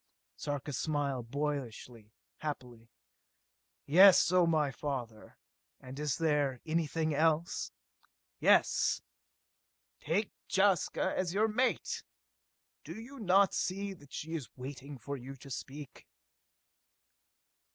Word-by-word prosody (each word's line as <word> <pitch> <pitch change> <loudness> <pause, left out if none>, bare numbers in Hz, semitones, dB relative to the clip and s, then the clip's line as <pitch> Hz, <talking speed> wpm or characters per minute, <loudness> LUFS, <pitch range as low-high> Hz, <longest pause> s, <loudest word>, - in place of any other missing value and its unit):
Sarka 145 0 -4
smiled 140 -4 -1
boyishly, 125 -6 -4 0.3
happily. 125 -6 -6 1.0
"Yes, 180 +3 +7
O 180 -2 +5
my 155 -4 +2
father; 125 -4 -5 0.4
and 130 +2 -9
is 150 -2 0
there 145 -5 +1
anything 160 -1 0
else?" 160 +2 +1 0.7
"Yes! - - +3 1.0
Take 185 +8 0 0.2
Jaska 195 -1 +2
as 185 -1 -1
your 215 +2 +4
mate! 245 +4 0 0.8
Do - - -8
you 260 +4 -10
not 195 -1 +4
see 195 +1 -2
that 145 -6 -17
she 160 +2 -5
is 145 -9 -4
waiting 135 +2 -7
for 140 +4 -5
you 135 +2 -8
to 135 +1 -13
speak?" 140 +2 -8
150 Hz, 105 wpm, -32 LUFS, 135-175 Hz, 1.0 s, Yes